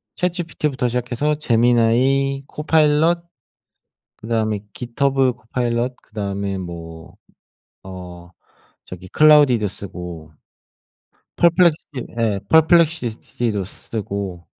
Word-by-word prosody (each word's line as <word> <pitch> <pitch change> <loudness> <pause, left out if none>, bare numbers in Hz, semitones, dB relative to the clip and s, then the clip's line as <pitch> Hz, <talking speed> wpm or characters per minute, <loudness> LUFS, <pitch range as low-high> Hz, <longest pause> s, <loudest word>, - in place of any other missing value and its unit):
ChatGPT부터 165 -7 -2
시작해서 125 +5 -1
제미나이, 125 +2 +2
코파일럿 160 +2 +2 1.0
그다음에 110 -2 -1
깃허브 130 +1 0
코파일럿 120 +1 -2
그다음에 100 -2 -4
뭐 85 -1 -9 0.7
어 90 -2 -10 0.6
저기 90 0 -10
클로드도 145 -7 +5
쓰고 90 -5 -9 1.1
퍼플렉시티 170 -6 +2
예 105 -4 0
퍼플렉시시티도 150 - +2
쓰고 100 -3 -6
120 Hz, 250 characters per minute, -20 LUFS, 100-150 Hz, 1.1 s, 클로드도